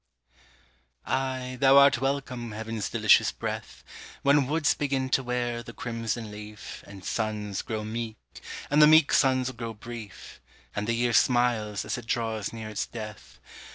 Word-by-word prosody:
Ay, 130 -1 -2
thou 135 0 +7
art 140 -3 +6
welcome, 135 -4 -2
heaven's 110 -1 -4
delicious - - +4
breath, - - -6 0.4
When 140 -1 +4
woods 155 0 +2
begin 135 -2 -1
to 135 - +2
wear 120 -1 -2
the 120 0 -10
crimson 115 -2 -4
leaf, 105 0 -9
And 100 -2 -11
suns 105 -3 -2
grow 110 -1 -4
meek, 110 0 -4 0.5
and 150 +1 +5
the 150 - +9
meek 155 -1 +6
suns 130 -1 +3
grow 115 -2 -6
brief, 115 -1 -10 0.3
And 105 +1 -2
the 115 - +1
year 120 0 +1
smiles 115 -4 +2
as - - -2
it 115 - -12
draws 110 -3 -1
near 110 -1 -7
its 110 - -3
death. 110 -3 -9
120 Hz, 155 wpm, -27 LUFS, 110-130 Hz, 0.5 s, the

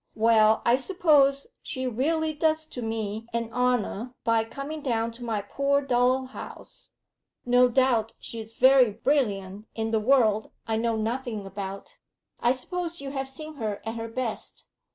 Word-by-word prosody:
Well, 220 -1 +4
I 240 +2 +5
suppose 280 -3 +3 0.2
she 260 0 -4
really 310 +6 0
does 315 +1 +1
to 255 -5 -8
me 225 -1 -3
an 230 -1 -2
honour 250 -1 0
by 230 -1 +3
coming 280 +6 -6
down 230 -4 0
to 235 +2 -11
my 220 -4 -2
poor 280 +6 +1
dull 255 0 +2
house; 255 - -10 0.6
no 250 0 +5
doubt 240 -3 +2
she's 225 -1 -8
very 260 0 +6
brilliant 205 -5 -1
in 225 0 -2
the 220 - +2
world 220 -3 +3 0.2
I 220 -1 -1
know 230 0 0
nothing 225 -1 -3
about. 195 - -7 0.4
I 240 - +3
suppose 340 +6 -3
you 275 -1 -6
have 270 -1 -3
seen 305 +3 -7
her 215 -5 -3
at 225 - -3
her 230 0 -5
best? 230 -1 -4
245 Hz, 155 wpm, -26 LUFS, 220-275 Hz, 0.6 s, very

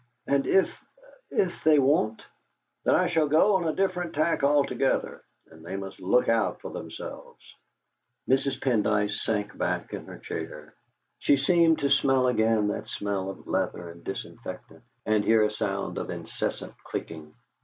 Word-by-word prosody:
"And 140 0 +1
if 190 - +2 0.5
if 180 -3 -1
they 155 -1 +6
won't?" 130 -6 +2 0.6
"Then - - +4
I - - +3
shall 160 -3 +2
go 175 +7 +4
on 175 -3 -2
a 155 - -1
different 180 -4 -1
tack 155 +2 +1
altogether, 140 -1 +1 0.3
and 80 0 -15
they 90 +3 -5
must 95 0 -6
look 95 +7 +2
out 115 -1 +1
for - - -8
themselves." - - -8 0.9
Mrs. 135 +1 +1
Pendyce 105 -4 +1
sank 105 -2 -2
back - - -2
in - - -6
her - - -9
chair; 75 0 -7 0.5
she 140 - +4
seemed 165 +3 +4
to 140 -1 +1
smell 135 -2 +4
again 110 -3 +2
that - - -4
smell 100 -2 -2
of 95 - -9
leather 85 -1 -2
and 85 0 -15
disinfectant, - - -7 0.2
and 110 -1 +2
hear 110 0 +4
a 105 - +1
sound 100 -2 -3
of - - -5
incessant - - -4
clicking. 75 -2 -7
125 Hz, 155 wpm, -27 LUFS, 105-150 Hz, 0.9 s, they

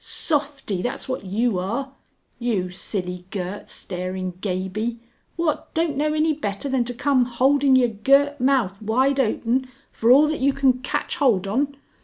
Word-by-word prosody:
_ - - -25
Softie 285 - -2
that's 245 - -4
what 255 -5 -4
you 205 +1 0
are! 235 +9 -3 0.5
You 205 -7 -1
silly 180 -1 -4
girt 190 0 -5
staring 185 0 -4
Gaby, 205 +5 -2 0.4
what 335 -3 -1
don't 325 -2 +1
know 300 +2 0
any 310 +1 +2
better 210 -4 -4
than 265 -2 +1
to 245 - -4
come 260 -1 +2
holding 265 +3 +3
yer 255 -1 +5
girt 275 +7 +3
mouth 245 -8 +1
wide 260 +6 +2
open 255 +1 +1 0.2
for 225 - 0
all 275 +5 +8
that 310 - -2
you 275 +1 +2
can 265 -2 +2
catch 255 - -2
holt 235 - +3
on? 275 +8 -1
245 Hz, 165 wpm, -23 LUFS, 200-275 Hz, 0.5 s, all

